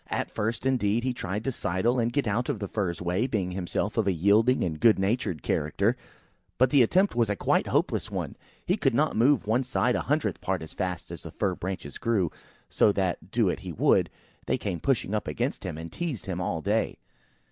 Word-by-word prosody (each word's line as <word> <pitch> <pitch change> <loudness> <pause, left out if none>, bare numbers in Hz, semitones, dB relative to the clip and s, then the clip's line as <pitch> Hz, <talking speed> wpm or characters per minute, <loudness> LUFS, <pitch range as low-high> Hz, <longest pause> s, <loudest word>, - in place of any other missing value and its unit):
At - - -2
first, 115 +3 -2
indeed, 120 -4 +1
he 130 -1 0
tried 105 -2 -4
to 135 - -1
sidle 115 +4 0
and 115 0 +1
get 145 +1 0
out 115 +5 0
of 140 - 0
the 100 -1 -4
Fir's 90 -5 -2
way, 90 +8 0
being 100 -7 -1
himself 95 +4 -2
of 110 -3 +2
a - - +4
yielding, 105 +8 +3 0.2
good 115 -2 +5
natured 95 - -1
character, 100 +10 +1 0.6
but 130 0 +4
the 140 - +6
attempt 185 - +3
was 115 -3 +1
a 105 - +1
quite - - +1
hopeless - - 0
one. - - -4 0.3
He 185 - +1
could 135 - +1
not 150 +3 +2
move 125 +3 +4
on - - -9
one 125 +4 +3
side 125 0 +1
a - - 0
hundredth 150 +2 -1
part 95 -3 -1
as 80 - -10
fast 90 -2 -4
as - - -7
the - - -8
fir 95 -2 -1
branches 90 -5 -6
grew; 100 -8 +1 0.4
so 105 - +3
that, 95 -4 -2
do - - +2
what - - 0
he - - -7
would, - - +3 0.4
they - - +1
came 90 -5 -3
pushing 115 - 0
up 105 - -1
against 75 -2 -2
him, - - -4
and 80 +1 -7
teased 165 - -4
him 90 -2 -3
all 80 -2 -2
day. 105 +3 0
105 Hz, 220 wpm, -27 LUFS, 95-125 Hz, 0.6 s, the